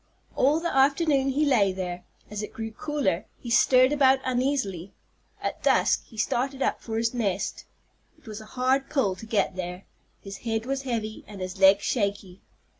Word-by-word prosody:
All 285 +5 +3
the 340 -2 -3
afternoon 275 0 +3
he 290 +3 +1
lay 220 -9 +3
there. 180 -1 -5 0.3
As 210 0 -4
it 210 - -7
grew 225 0 -5
cooler 230 - -2
he 240 - -8
stirred 255 +2 +5
about 270 -2 +5
uneasily. 245 - -1 0.5
At - - -3
dusk - - +2
he 225 - -16
started 260 +5 -1
up - - -1
for 225 -1 -4
his 230 +1 0
nest. 200 -5 -2 0.5
It - - -26
was 215 -1 -7
a - - -11
hard 265 +2 +1
pull 215 -11 +1
to 220 - -11
get 205 -4 0
there. 180 0 -6 0.3
His 195 0 -9
head 225 -1 -3
was 270 +1 -2
heavy, 225 -5 -4
and 205 -2 -10
his 185 +1 -6
legs 195 +1 +6
shaky. 200 -4 -2
225 Hz, 180 wpm, -26 LUFS, 195-270 Hz, 0.5 s, legs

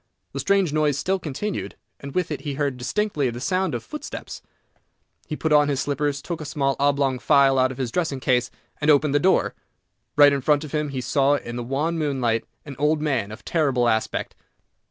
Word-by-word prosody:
The - - -4
strange 195 -6 +2
noise 150 -2 +2
still 190 +5 0
continued, 180 +7 -4 0.2
and 140 -1 -9
with 180 -2 0
it - - -3
he 145 -3 -4
heard 140 -2 -1
distinctly 145 +1 -1
the 120 0 -6
sound 185 +1 0
of 115 - -4
footsteps. 300 - -7 0.9
He 155 - -3
put 160 0 0
on 145 -1 +5
his 140 -2 0
slippers, 145 0 -1
took 170 -3 -5
a - - -6
small 135 -1 0
oblong 140 -2 +2
phial 135 0 +4
out 130 0 +3
of 130 - -8
his 130 -3 -2
dressing 160 -3 -1
case, 125 -2 +1 0.3
and 150 - 0
opened 145 -1 +4
the 145 - +4
door. 190 +4 +2 0.6
Right 145 -1 +7
in 140 - -1
front 150 +2 +2
of 150 - -8
him 150 -1 -1
he 130 -2 -3
saw, 140 +3 +2
in 120 -4 -5
the 120 - -3
wan 150 +7 -1
moonlight, 130 -7 0 0.2
an 140 -2 -8
old 150 +1 +2
man 135 -9 -1
of 110 0 -11
terrible 135 -7 +1
aspect. 110 -1 -1
145 Hz, 205 wpm, -23 LUFS, 130-155 Hz, 0.9 s, Right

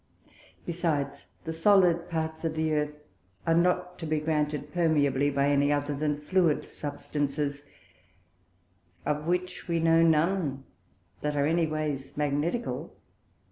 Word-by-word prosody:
Besides, 150 -5 -2 0.2
the 160 - -4
solid 175 -1 +4
parts 160 -1 -3
of 160 -1 -1
the 160 0 0
Earth 150 0 -2 0.4
are 165 - +3
not 180 +1 +1
to 165 - -5
be 155 0 +1
granted 150 -1 -1
permeably 145 -5 +2
by 140 0 +1
any 145 0 +3
other 145 0 0
than 150 0 0
fluid 165 0 +1
Substances, 145 -1 -3 1.4
of 150 +1 -1
which 180 +1 -2
we 170 -1 +1
know 165 0 +4
none 160 -3 +2 0.6
that 150 0 -1
are 140 -1 +2
any 165 +1 +2
ways 150 -3 -3
Magnetical. 150 +10 -1
155 Hz, 130 wpm, -28 LUFS, 145-165 Hz, 1.4 s, solid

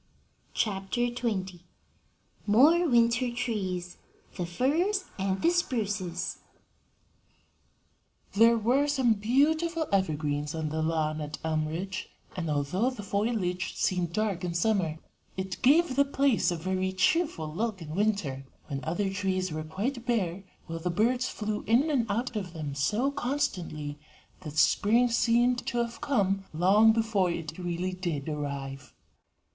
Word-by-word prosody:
CHAPTER 195 +2 -1
XX. 205 -7 -3 0.9
MORE 310 +11 +5
WINTER 235 0 +3
TREES: 190 -8 -3 0.4
THE 175 - -3
FIRS 330 - +1
AND 190 0 -1
THE 335 - +5
SPRUCES. 210 - -2 1.9
There 230 +3 +6
were 250 +6 +2
some 265 -5 +3
beautiful 315 +10 +1
evergreens 150 -5 0
on 160 -1 -2
the 160 +1 -2
lawn 155 -1 0
at 150 0 -5
Elmridge, 160 +5 -2 0.3
and, 165 -3 -3
although 150 - +1
the 255 -5 -7
foliage 200 -3 -1
seemed 180 -3 0
dark 200 -2 -1
in 175 -1 -3
summer, 175 -4 +1 0.4
it 190 -1 -4
gave 290 +1 +4
the 280 - +5
place 275 -3 +2
a 175 - 0
very 185 +3 -1
cheerful 185 - +1
look 215 +2 -2
in 155 -2 -7
winter, 190 -9 0 0.3
when 140 -1 -4
other 190 +5 -1
trees 185 -2 -1
were 155 0 -3
quite 220 - -3
bare, 195 -6 0 0.2
while 165 0 -5
the 180 +2 -2
birds 245 +8 +1
flew 210 -1 -3
in 255 +8 +3
and 240 -6 +1
out 235 +4 -1
of 190 -5 -4
them 155 -4 -5
so 210 - +1
constantly 190 - -3 0.4
that 150 -1 -8
spring 230 +9 +4
seemed 240 +1 +2
to 240 - -2
have 235 -1 -2
come 200 -9 +1
long 200 +6 +6
before 220 -5 +1
it 165 -1 -5
really 175 +1 -2
did 170 -6 -3
arrive. 140 -2 -5
195 Hz, 135 wpm, -28 LUFS, 170-240 Hz, 1.9 s, There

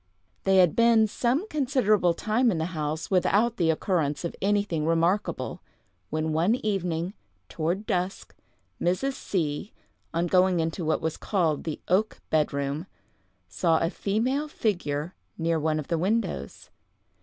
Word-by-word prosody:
They 195 0 +4
had 180 -4 +5
been 230 -1 +5
some 250 - 0
considerable 245 - +2
time 230 +3 +2
in 180 - 0
the 160 - -1
house 155 +2 -3
without 210 +5 +2
the 170 -3 +2
occurrence 160 -2 0
of 170 - -4
anything 200 -6 +1
remarkable, 170 +5 0 0.5
when 155 +1 -1
one 170 +9 +3
evening, 185 -7 -2 0.4
toward 175 +6 -2
dusk, 185 -3 -2 0.5
Mrs. 185 +11 +1
C——, 170 - -2 0.4
on 170 +1 0
going 180 0 +3
into 165 +2 -2
what 155 0 0
was 160 0 -2
called 165 -8 0
the 160 -3 -3
oak 200 +5 +1
bed 155 -1 +2
room, 140 +4 -3 0.6
saw 165 -3 +2
a 165 +2 0
female 250 +11 0
figure 175 - -2 0.2
near 165 -1 +1
one 155 0 0
of 150 - -4
the 165 -2 0
windows. 220 +6 -2
180 Hz, 145 wpm, -27 LUFS, 160-215 Hz, 0.6 s, had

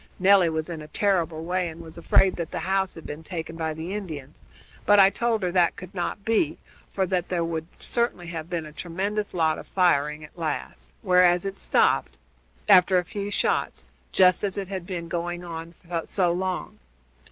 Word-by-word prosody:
Nelly 190 -2 +5
was 160 -1 -2
in 165 -3 -6
a 150 - -9
terrible 170 -3 0
way, 180 0 0
and 160 +1 -10
was 165 -1 -9
afraid 185 +2 +3
that 170 -2 -3
the - - -4
house 190 0 0
had 165 - -11
been 150 +2 -6
taken 165 -1 -6
by 160 -1 -2
the 165 +4 -5
Indians, 155 -10 -7 0.4
but 205 - +5
I 195 0 +7
told 230 -3 0
her 180 - 0
that 175 -2 +3
could 185 -1 -10
not 195 +2 -3
be, 225 +8 +1 0.3
for 190 - 0
that 180 -1 -1
there 175 -2 0
would 165 -1 -3
certainly 235 -7 -1
have 165 -1 -6
been 170 -3 -3
a 155 - -10
tremendous 195 +6 -3
lot 160 -2 +2
of - - -11
firing 150 -5 +2
at 150 - -13
last, 160 -4 -4
whereas 180 -2 +4
it 195 0 -4
stopped, - - +2 0.5
after 180 +1 +6
a 180 - +1
few 200 +1 -4
shots, - - 0 0.3
just 185 0 +4
as 200 -1 -1
it 195 -2 -4
had 190 -3 -5
been 175 -3 -4
going 175 +1 -3
on 165 0 -7 0.3
so 180 -3 +1
long. 180 - -3
175 Hz, 195 wpm, -25 LUFS, 165-190 Hz, 0.5 s, I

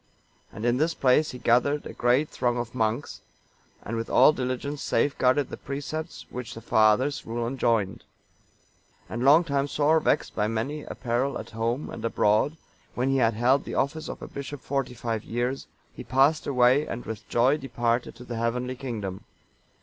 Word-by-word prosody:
And 110 - -6
in 120 +1 +2
this 160 +4 +1
place 135 +4 +3
he 125 - -7
gathered 125 +5 +2
a - - -7
great 125 +5 +2
throng 120 -1 -1
of 120 -1 -4
monks, 115 +2 -2 0.6
and 115 - -4
with 115 0 -3
all 155 - +6
diligence 130 +2 -3
safeguarded 130 +1 +1
the - - -5
precepts 150 +4 -5
which 125 -2 -6
the - - -7
Fathers' 110 +7 +3
rule 115 +1 -3
enjoined. 115 -6 0 1.0
And 120 +2 -4
long 150 +6 +7
time 140 -3 0
sore 150 +2 +3
vexed 150 - 0
by 105 - +1
many 115 +7 -2
a - - -7
peril 125 +3 -1
at - - -8
home 115 +5 -2
and - - -8
abroad, 115 +6 +2 0.4
when 130 +2 +1
he 135 - +2
had 115 -4 +2
held 130 +5 +3
the - - -6
office 150 +3 -1
of - - -7
a - - -6
bishop 140 0 -7
forty 135 -3 -2
five 115 -2 -3
years, 120 +3 -2 0.3
he - - -8
passed 135 +5 +2
away 130 +2 +4
and 120 - -5
with 110 -1 -7
joy 130 +5 +3
departed 120 -3 -1
to 125 - -11
the 120 -2 -6
heavenly 125 +2 -1
kingdom. 110 -8 -5
125 Hz, 180 wpm, -26 LUFS, 115-140 Hz, 1.0 s, long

